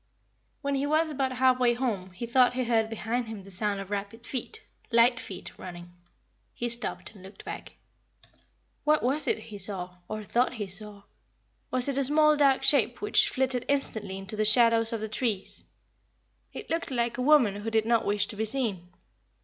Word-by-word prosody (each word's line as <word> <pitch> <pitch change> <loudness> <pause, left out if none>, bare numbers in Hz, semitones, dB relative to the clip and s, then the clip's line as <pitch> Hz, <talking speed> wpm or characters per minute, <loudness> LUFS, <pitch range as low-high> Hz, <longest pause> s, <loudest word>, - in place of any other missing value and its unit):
When 280 0 0
he 275 +1 0
was 310 +1 +2
about 265 -2 -1
half 255 0 +3
way 240 -1 +3
home 220 -7 -2
he 210 +6 -5
thought 245 +1 +4
he 255 0 -1
heard 225 -2 +1
behind 225 +2 -2
him 220 -3 -7
the 195 - -13
sound 200 +1 -1
of 195 0 -8
rapid 205 +3 -5
feet 430 - -5 0.3
light 235 +1 +4
feet 185 -2 -8
running. 175 -1 -9 0.6
He 240 - -2
stopped 235 +1 -1
and 200 - -15
looked 190 +1 -13
back. - - -7 1.1
What 305 0 +3
was 280 +4 +2
it - - +2
he 215 -2 -10
saw, 180 -2 -2
or 215 0 -5
thought 240 +6 +1
he 220 -4 -4
saw? 200 +1 -4 0.7
Was 255 0 0
it 280 -1 0
a - - +2
small 305 +2 +4
dark 275 -2 +3
shape 280 +1 +3
which 415 - +3
flitted 255 -2 0
instantly 220 -8 -1
into 195 +2 -7
the 215 - +1
shadow 230 +1 +5
of 225 - 0
the 220 - -3
trees? 215 -3 -2 0.9
It 420 - -9
looked 330 0 -1
like 240 -2 -1
a - - 0
woman 250 -8 +4
who 210 +2 -4
did 220 -1 +1
not 230 -1 +2
wish 205 0 +1
to - - -7
be 220 +2 -1
seen. 215 -7 -2
230 Hz, 190 wpm, -28 LUFS, 205-260 Hz, 1.1 s, shadow